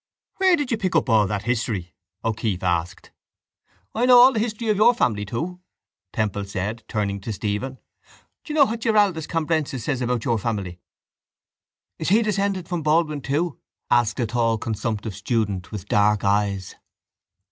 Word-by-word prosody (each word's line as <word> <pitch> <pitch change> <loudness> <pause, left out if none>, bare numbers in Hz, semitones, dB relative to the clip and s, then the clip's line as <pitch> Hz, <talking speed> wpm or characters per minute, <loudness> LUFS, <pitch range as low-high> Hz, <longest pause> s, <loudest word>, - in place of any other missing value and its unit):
—Where 375 -2 +5
did 290 -6 -3
you 230 - +1
pick 185 -4 -1
up 160 - +2
all 105 -2 +4
that 105 0 -3
history? 110 -6 -2 0.3
O'Keeffe 110 -4 -1
asked. 90 0 -2 0.8
—I 245 +3 +1
know 250 -1 +8
all 255 +2 +8
the 220 - 0
history 225 0 -2
of 210 - +2
your 235 +4 +5
family, 105 - 0
too, 165 - -4 0.5
Temple 105 -2 -2
said, 100 +4 -4
turning 100 -2 -2
to 110 - -5
Stephen. 105 +6 -3 0.7
Do - - -8
you - - -2
know 290 -2 +7
what 230 -1 -4
Giraldus 205 -8 +2
Cambrensis 155 -6 -1
says 130 0 -2
about 120 -2 -1
your 115 -2 +1
family? 100 -6 -3 1.2
—Is - - -1
he 220 +5 +4
descended 195 -4 -1
from 175 -2 -2
Baldwin 155 -1 +1
too? 150 +4 -1 0.3
asked 120 0 +2
a 120 - +1
tall 115 0 +1
consumptive 110 -1 -3
student 105 -2 -2
with 105 -4 -6
dark 105 0 +2
eyes. 100 -1 0
120 Hz, 165 wpm, -23 LUFS, -, 1.2 s, know